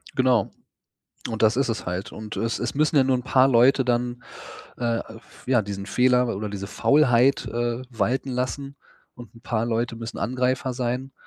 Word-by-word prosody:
Genau. 130 Hz, -2 st, +2 dB, 0.8 s
Und 110 Hz, -2 st, -4 dB
das 110 Hz, +1 st, +4 dB
ist 135 Hz, 0 st, +1 dB
es 115 Hz, -5 st, -3 dB
halt 90 Hz, +3 st, -4 dB
und 110 Hz, -1 st, -8 dB
es 115 Hz, 0 st, -2 dB
es 120 Hz, +2 st, -3 dB
müssen 155 Hz, +1 st, +2 dB
ja 135 Hz, -, +7 dB
nur 130 Hz, 0 st, +2 dB
'n 125 Hz, -, -5 dB
paar 130 Hz, 0 st, +4 dB
Leute 130 Hz, +2 st, +4 dB
dann, 120 Hz, 0 st, -1 dB, 0.5 s
äh, 115 Hz, -1 st, -1 dB, 0.2 s
f 110 Hz, -, -20 dB
ja, 125 Hz, -4 st, +3 dB
diesen 100 Hz, 0 st, -6 dB
Fehler 125 Hz, -2 st, +2 dB
oder 105 Hz, +1 st, -4 dB
diese 100 Hz, -1 st, -6 dB
Faulheit, 135 Hz, +1 st, +3 dB
äh, 120 Hz, +1 st, -2 dB
walten 125 Hz, +3 st, -1 dB
lassen 135 Hz, +3 st, -3 dB, 0.4 s
und 120 Hz, -1 st, -13 dB
'n -, -, -15 dB
paar 115 Hz, -2 st, -1 dB
Leute 115 Hz, 0 st, -1 dB
müssen 115 Hz, 0 st, -7 dB
Angreifer 130 Hz, +1 st, -1 dB
sein 125 Hz, +2 st, -3 dB
120 Hz, 180 wpm, -24 LUFS, 115-130 Hz, 0.8 s, ja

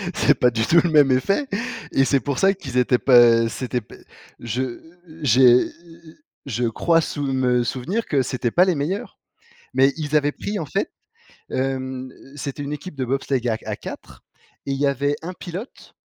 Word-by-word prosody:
C'est 145 Hz, -, +3 dB
pas 125 Hz, 0 st, +3 dB
du 115 Hz, -1 st, 0 dB
tout 170 Hz, -, +5 dB
le 175 Hz, -, +1 dB
même 145 Hz, -4 st, +5 dB
effet! 195 Hz, -, +1 dB, 0.4 s
Et 135 Hz, -, +3 dB
c'est 140 Hz, 0 st, +2 dB
pour 140 Hz, -3 st, -3 dB
ça 195 Hz, 0 st, +4 dB
qu'ils 140 Hz, -10 st, -6 dB
étaient 125 Hz, 0 st, +3 dB
pas, 130 Hz, -1 st, +5 dB, 0.3 s
heu, 115 Hz, -, 0 dB
c'était 125 Hz, -1 st, -3 dB
p -, -, -15 dB, 0.4 s
je 120 Hz, +1 st, -3 dB, 0.4 s
j'ai 125 Hz, -2 st, +5 dB, 0.8 s
je 125 Hz, -2 st, -2 dB
crois 165 Hz, +9 st, +2 dB
sou 145 Hz, -2 st, -4 dB
me 125 Hz, -2 st, +2 dB
souvenir 155 Hz, -, -2 dB
que 140 Hz, -3 st, +1 dB
c'étaient 125 Hz, -1 st, -2 dB
pas 180 Hz, +7 st, +5 dB
les 185 Hz, -2 st, +1 dB
meilleurs! 155 Hz, +8 st, -4 dB, 0.6 s
Mais 135 Hz, +1 st, +4 dB
ils 150 Hz, -1 st, -1 dB
avaient 145 Hz, 0 st, +2 dB
pris 205 Hz, 0 st, -4 dB
en 160 Hz, -, -4 dB
fait, 195 Hz, -, -2 dB, 0.6 s
hem, 130 Hz, -1 st, -3 dB, 0.2 s
c'était 145 Hz, 0 st, -5 dB
une 145 Hz, +1 st, -4 dB
équipe 150 Hz, +2 st, -8 dB
de 130 Hz, -, -2 dB
bobsleigh 130 Hz, -1 st, -1 dB
à 110 Hz, -, 0 dB
à -, -, -3 dB
4 -, -, -10 dB, 0.4 s
et 140 Hz, -, -3 dB
il 135 Hz, -, -1 dB
y 145 Hz, -, +2 dB
avait 140 Hz, +1 st, 0 dB
un 180 Hz, +3 st, -6 dB
pilote, 185 Hz, +8 st, -9 dB
135 Hz, 185 wpm, -22 LUFS, 125-155 Hz, 0.8 s, tout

